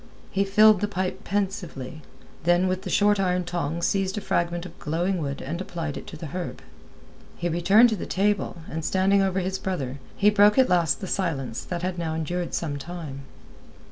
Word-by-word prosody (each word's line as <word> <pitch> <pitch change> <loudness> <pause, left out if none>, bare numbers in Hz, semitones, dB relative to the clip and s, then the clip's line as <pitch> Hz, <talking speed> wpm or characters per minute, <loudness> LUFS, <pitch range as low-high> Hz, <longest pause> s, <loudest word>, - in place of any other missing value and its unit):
He 195 - +2
filled 210 0 +6
the 205 - +1
pipe 185 -2 -3
pensively, 185 - -3 0.4
then 175 +2 +3
with 185 0 -1
the - - -6
short 205 0 +3
iron 180 -1 +1
tongs 170 -1 -2
seized 195 0 0
a - - -2
fragment 170 -1 -1
of 180 - -11
glowing 175 +5 -1
wood 140 -3 -4
and 165 +6 -4
applied 165 -5 -4
it - - -8
to 155 - -8
the 160 - -7
herb. 180 - -5 0.7
He 175 - -1
returned 190 +8 +5
to 220 - 0
the 195 - -6
table, 195 -3 0
and 160 0 -4
standing 190 +4 +3
over 190 -1 +1
his 190 +1 -2
brother, 140 -8 -3 0.2
he 210 +1 +4
broke 210 +1 +5
at 260 -1 +5
last 170 -4 +2
the 190 - -4
silence 145 - -2
that 175 -1 -4
had 180 -1 -2
now 160 -2 -2
endured 175 +2 -2
some 145 -4 -2
time. 150 -4 -7
180 Hz, 195 wpm, -25 LUFS, 165-195 Hz, 0.7 s, filled